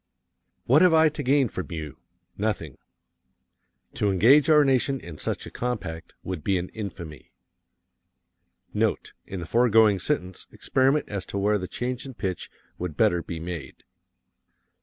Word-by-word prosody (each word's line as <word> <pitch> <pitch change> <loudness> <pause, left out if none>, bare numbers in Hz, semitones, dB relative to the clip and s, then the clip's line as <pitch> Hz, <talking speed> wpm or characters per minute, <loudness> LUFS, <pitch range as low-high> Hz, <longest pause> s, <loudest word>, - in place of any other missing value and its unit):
What 140 +6 +5
have 180 -3 +6
I 160 0 +6
to 150 0 -6
gain 135 0 +3
from 95 -4 -6
you? 80 -5 -6 0.4
Nothing. 100 - -3 1.1
To 105 - 0
engage 130 - +5
our 150 -2 +6
nation 135 0 +1
in 85 -7 -10
such - - -3
a - - -9
compact 100 -10 -4
would 90 -5 -5
be 95 +1 +1
an 90 +1 -4
infamy. 85 - -8 1.4
Note: - - -1
In 95 - -5
the - - -5
foregoing 110 0 +4
sentence, 90 +1 -3
experiment 135 +3 +1
as 100 -2 -4
to - - -5
where 105 +1 +2
the 90 - -5
change 125 +5 -4
in 130 - -9
pitch 95 -4 -4 0.3
would 85 -4 -5
better 85 0 +3
be 85 -1 -6
made. 80 -5 -7
100 Hz, 150 wpm, -25 LUFS, 85-130 Hz, 1.4 s, have